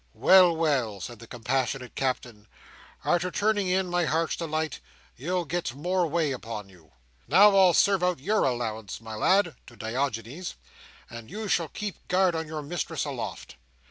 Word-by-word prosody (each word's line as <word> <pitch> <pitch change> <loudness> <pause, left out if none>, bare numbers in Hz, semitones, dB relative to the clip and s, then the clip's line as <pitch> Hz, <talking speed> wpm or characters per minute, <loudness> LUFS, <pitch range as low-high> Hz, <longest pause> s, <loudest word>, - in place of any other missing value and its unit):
"Well, 180 -3 +6
well!" 135 -11 0
said 115 +5 -7
the 115 - -12
compassionate 125 +2 -2
Captain, 120 -5 -3 0.6
"arter 175 +1 +2
turning 205 +1 +1
in, 185 +1 +2
my 175 -1 +1
Heart's 160 +2 0
Delight, 160 -2 -3 0.4
you'll 175 +6 -2
get 165 -6 -3
more 175 +4 0
way 160 -2 0
upon 110 -5 -6
you. 85 -7 -20 0.3
Now, 195 - +7
I'll 185 -3 +6
serve 195 -2 +4
out 180 -1 +2
your 210 +10 +1
allowance, 110 -5 -2
my 115 0 -9
lad." 185 - +3
To 120 - -13
Diogenes. 125 +7 -3 0.5
"And 115 -1 -10
you 215 +4 -5
shall 170 -4 +1
keep 205 +6 -7
guard 185 -1 +3
on 160 -1 -3
your 155 -1 -5
mistress 165 +2 -3
aloft." - - -6
155 Hz, 160 wpm, -27 LUFS, 120-180 Hz, 0.6 s, Now